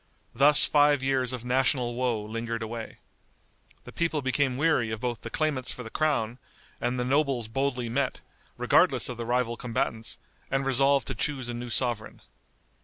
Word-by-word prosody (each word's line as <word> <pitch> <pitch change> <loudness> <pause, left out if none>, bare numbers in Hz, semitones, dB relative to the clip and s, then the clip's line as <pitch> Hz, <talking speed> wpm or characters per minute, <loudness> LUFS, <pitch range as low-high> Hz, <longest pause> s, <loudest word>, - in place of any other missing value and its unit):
Thus 145 +4 +6
five 145 -2 +3
years 130 -2 +1
of 125 -2 -5
national 125 -1 +1
woe 120 -3 -1
lingered 115 +1 -4
away. 115 0 -6 0.9
The - - -11
people 165 -4 -1
became 130 0 0
weary 145 -6 +2
of 110 0 -4
both 120 -1 -3
the - - -6
claimants 140 -5 -1
for 125 - -6
the 115 - -9
crown, 125 -6 0 0.4
and 125 +1 -1
the 125 - -1
nobles 135 -3 +1
boldly 125 +1 -1
met, 130 +3 -1 0.4
regardless - - +4
of 125 - -5
the 120 - -4
rival 120 -1 0
combatants, 115 -1 -3 0.3
and 135 0 0
resolved 135 +1 +3
to 135 - -3
choose 130 0 -2
a - - -3
new 120 +1 -6
sovereign. 120 -2 -2
125 Hz, 170 wpm, -27 LUFS, 120-135 Hz, 0.9 s, Thus